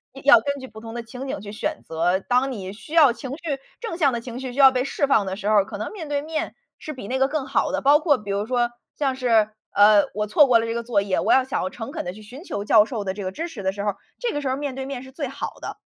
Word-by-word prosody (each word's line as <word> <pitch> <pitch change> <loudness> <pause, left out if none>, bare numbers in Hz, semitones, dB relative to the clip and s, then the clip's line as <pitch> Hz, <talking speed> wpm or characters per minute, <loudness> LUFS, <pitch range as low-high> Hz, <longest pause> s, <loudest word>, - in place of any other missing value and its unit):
是 - - -9
要 285 - +9
根 280 +2 -2
据 260 - -8
不 220 -2 -12
同 225 0 -8
的 235 - -4
情 250 +4 -8
景 - - -3
去 205 -1 -8
选 305 +8 -3
择。 170 +3 +1
当 255 +5 +1
你 195 -4 -6
需 300 +9 -12
要 295 -7 +6
情 255 +2 -7
绪 295 -1 -3 0.2
正 445 -8 -5
向 285 -6 +3
的 235 - -2
情 240 +1 -7
绪 260 -2 -5
需 270 - -7
要 270 -1 +9
被 255 0 0
释 280 +1 -1
放 215 -7 +3
的 190 0 -3
时 205 0 -5
候， 210 -2 +5
可 205 0 -8
能 215 - -4
面 325 -7 -7
对 285 -1 0
面 315 +2 -3 0.2
是 310 - -7
比 230 -6 -8
那 260 - -1
个 265 0 +3
更 290 -3 -2
好 275 - +1
的。 290 - -1
包 285 +2 +6
括 295 -4 +3
比 205 -1 -10
如 200 +1 -1
说， 240 -1 +1 0.3
像 270 -3 0
是， 225 -4 +3 0.2
呃， 205 0 +6
我 210 +1 -2
错 285 +7 +6
过 240 -3 +5
了 225 - -1
这 230 - -2
个 235 0 -3
作 225 -4 +1
业， 195 -2 0
我 - - +1
要 260 -1 +5
想 265 - -2
要 185 - -2
诚 225 +6 -7
恳 325 - -3
地 180 - -4
去 215 +3 -12
寻 250 - -11
求 205 - -4
教 210 0 +6
授 220 -3 -5
的 190 - -1
这 200 0 -6
个 185 - -3
支 330 - -4
持 230 - -8
的 190 - +1
时 200 +1 -6
候， 205 -2 -1 0.2
这 485 -2 -2
个 290 - -2
时 270 - -2
候 260 - -1
面 285 -3 -4
对 265 0 -4
面 270 -2 -5
是 265 - -12
最 280 -3 -4
好 - - -5
的。 - - -6
250 Hz, 340 characters per minute, -23 LUFS, 210-280 Hz, 0.3 s, 要